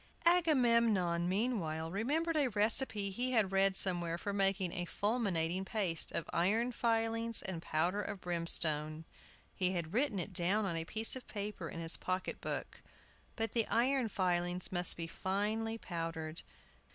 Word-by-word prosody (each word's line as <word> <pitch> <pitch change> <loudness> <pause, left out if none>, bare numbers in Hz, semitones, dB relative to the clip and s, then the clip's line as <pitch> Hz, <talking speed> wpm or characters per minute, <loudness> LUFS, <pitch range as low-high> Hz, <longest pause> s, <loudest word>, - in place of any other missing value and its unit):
Agamemnon, 235 - +3
meanwhile, 180 -7 -1
remembered 300 - 0
a 295 -3 +3
recipe 210 -1 0
he 250 +6 -2
had 215 -5 +2
read 195 0 +3
somewhere 175 -3 -1
for 200 +3 -4
making 195 -2 +1
a 175 -1 -3
"fulminating 190 -5 0
paste" 190 -5 0
of 165 - -2
iron 220 +8 +2
filings 230 -1 +1
and 185 -4 -4
powder 175 +6 0
of 200 -1 -5
brimstone. 160 -3 +1 0.5
He 185 0 0
had 170 -1 -3
written 245 -2 +1
it 185 +2 -4
down 190 +5 +3
on 175 -4 -2
a 165 0 -2
piece 220 +7 +2
of 260 - -9
paper 205 -5 -5
in - - -7
his 165 0 +2
pocket 185 0 -3
book. - - -5 0.5
But 225 -2 -2
the 230 -2 +2
iron 250 0 +2
filings 180 -2 +1
must 175 -1 +2
be 165 - -4
finely 210 +6 -2
powdered. 165 -4 -4
195 Hz, 150 wpm, -34 LUFS, 175-225 Hz, 0.5 s, Agamemnon